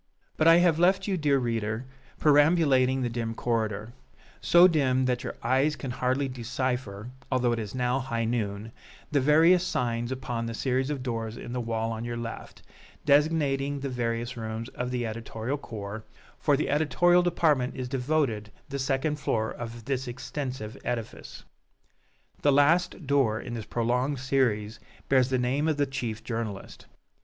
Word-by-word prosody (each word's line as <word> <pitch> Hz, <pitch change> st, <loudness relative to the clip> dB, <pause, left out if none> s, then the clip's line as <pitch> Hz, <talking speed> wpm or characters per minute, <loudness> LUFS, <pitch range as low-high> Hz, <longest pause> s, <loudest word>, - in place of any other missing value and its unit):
But 155 Hz, -, +2 dB
I 165 Hz, -, +9 dB
have 170 Hz, -2 st, +4 dB
left 190 Hz, +2 st, +3 dB
you, 195 Hz, -, +1 dB
dear 150 Hz, -5 st, +2 dB
reader, 115 Hz, -1 st, -2 dB, 0.3 s
perambulating 145 Hz, -4 st, +4 dB
the -, -, +1 dB
dim 115 Hz, -1 st, -3 dB
corridor 110 Hz, -1 st, -2 dB, 0.5 s
so 175 Hz, +2 st, +7 dB
dim 130 Hz, -6 st, +2 dB
that 125 Hz, -1 st, 0 dB
your -, -, -5 dB
eyes 135 Hz, +5 st, +2 dB
can 135 Hz, -, -5 dB
hardly 130 Hz, +3 st, 0 dB
decipher, 125 Hz, -3 st, -3 dB, 0.2 s
although 125 Hz, -2 st, +2 dB
it 115 Hz, -, -1 dB
is 105 Hz, +1 st, -5 dB
now 125 Hz, +1 st, +1 dB
high 115 Hz, -3 st, -2 dB
noon, 110 Hz, -2 st, -2 dB, 0.4 s
the 145 Hz, -2 st, +2 dB
various 165 Hz, +6 st, +5 dB
signs 120 Hz, -7 st, -1 dB
upon 125 Hz, -3 st, -3 dB
the 115 Hz, -, -4 dB
series 130 Hz, +2 st, 0 dB
of 140 Hz, -4 st, -3 dB
doors 115 Hz, -2 st, -3 dB
in 120 Hz, -, -7 dB
the 125 Hz, -, -2 dB
wall 115 Hz, -1 st, -2 dB
on 110 Hz, 0 st, -4 dB
your 120 Hz, 0 st, -4 dB
left, 115 Hz, -1 st, -7 dB, 0.4 s
designating 145 Hz, -1 st, +2 dB
the 140 Hz, -, -3 dB
various 120 Hz, 0 st, -2 dB
rooms 110 Hz, +1 st, -5 dB
of 125 Hz, -1 st, -4 dB
the 125 Hz, -1 st, -2 dB
editorial 115 Hz, +4 st, -4 dB
corps, 110 Hz, -3 st, -7 dB, 0.4 s
for 145 Hz, -, +3 dB
to 145 Hz, -, 0 dB
the -, -, -3 dB
editorial 175 Hz, +4 st, +4 dB
department 155 Hz, -7 st, +1 dB
is 130 Hz, -2 st, -4 dB
devoted 125 Hz, -5 st, -1 dB, 0.2 s
the 140 Hz, 0 st, -4 dB
second 135 Hz, +3 st, 0 dB
floor 110 Hz, -6 st, -1 dB
of 115 Hz, -1 st, -7 dB
this 130 Hz, -1 st, -2 dB
extensive 125 Hz, -2 st, -5 dB
edifice. 120 Hz, -3 st, -5 dB, 1.0 s
The 145 Hz, -, +4 dB
last 160 Hz, +5 st, +3 dB
door 130 Hz, -6 st, +2 dB
in 120 Hz, -, -7 dB
this 115 Hz, -2 st, -5 dB
prolonged 125 Hz, +4 st, 0 dB
series 120 Hz, -5 st, 0 dB, 0.3 s
bears 130 Hz, -2 st, +4 dB
the 130 Hz, -, +1 dB
name 130 Hz, +5 st, 0 dB
of 155 Hz, -2 st, +1 dB
the 145 Hz, -, +2 dB
chief 125 Hz, -5 st, -4 dB
journalist. 115 Hz, -4 st, -5 dB
125 Hz, 165 wpm, -27 LUFS, 115-145 Hz, 1.0 s, I